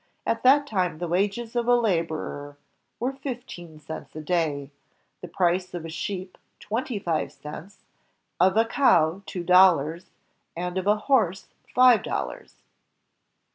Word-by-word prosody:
At 230 - 0
that 280 +3 +5
time 185 - -1
the 175 +2 -4
wages 205 +7 -1
of 240 -1 0
a 245 - +6
laborer 165 -9 -2 0.4
were 255 +3 -1
fifteen 245 - -8
cents 160 0 -9
a 155 - -5
day, 150 -4 -1 0.5
the 180 - -7
price 180 +1 0
of 165 -2 -5
a - - -6
sheep 185 +2 -5 0.2
twenty 230 +2 -3
five 170 -5 -2
cents, 165 +6 -11 0.6
of 190 +3 +4
a 225 - +5
cow 190 - +3
two 180 - -5
dollars, 175 -3 +4 0.5
and 180 +1 -2
of 190 - -5
a 210 +1 +4
horse 205 -9 +1 0.3
five 250 -3 +6
dollars. - - -5
185 Hz, 140 wpm, -25 LUFS, 165-225 Hz, 0.6 s, a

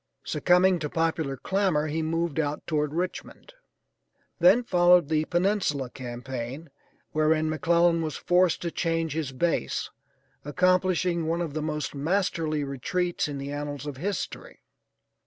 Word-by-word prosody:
Succumbing 180 0 +3
to 150 -2 -3
popular 160 -4 -1
clamor 185 -1 0
he 155 +1 -2
moved 165 0 -1
out 150 -1 -2
toward 150 -2 0
Richmond. 180 - -5 0.9
Then 185 +8 +6
followed 175 -6 +4
the 155 -1 +1
Peninsula 175 -8 0
campaign, 130 +3 -6 0.4
wherein 155 0 +2
McClellan 170 +1 +3
was 155 -3 -3
forced 180 -1 +2
to 170 - -2
change 165 -3 -1
his 155 -4 -3
base, 130 - -1 0.5
accomplishing 180 +1 +1
one 165 +1 0
of 165 -4 -3
the 155 - -2
most 150 -2 -3
masterly 155 -1 0
retreats 170 +7 -2
in 145 -1 -5
the 140 +1 -5
annals 145 0 -5
of 145 -3 -6
history. 200 - -5
160 Hz, 135 wpm, -26 LUFS, 145-175 Hz, 0.9 s, Then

